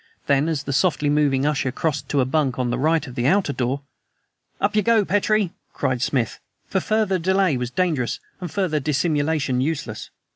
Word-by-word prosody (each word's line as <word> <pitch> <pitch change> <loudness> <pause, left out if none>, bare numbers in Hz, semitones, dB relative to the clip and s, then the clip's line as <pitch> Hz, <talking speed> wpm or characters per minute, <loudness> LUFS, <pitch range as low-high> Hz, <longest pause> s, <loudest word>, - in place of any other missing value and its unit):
Then, 140 +3 +2
as 155 -4 -1
the 140 - -3
softly 150 -2 +2
moving 145 -2 +2
usher 135 -3 0
crossed 150 +2 -2
to 140 - +2
a - - +2
bunk 135 -1 0
on 125 -2 0
the 125 - -1
right 160 +2 +2
of 125 - -9
the 120 +1 0
outer 185 -2 +2
door 130 +2 -1 0.8
"Up 205 +1 0
you 210 - +4
go, 220 0 +3
Petrie," 205 -1 +1 0.2
cried 130 -2 -1
Smith, 125 -4 0 0.3
for 190 - 0
further 210 -1 +1
delay 190 -2 +2
was 125 -1 -2
dangerous 150 -5 0 0.2
and 180 -2 -5
further 185 -7 0
dissimulation 145 -2 0
useless. 140 -7 -3
150 Hz, 185 wpm, -22 LUFS, 130-185 Hz, 0.8 s, you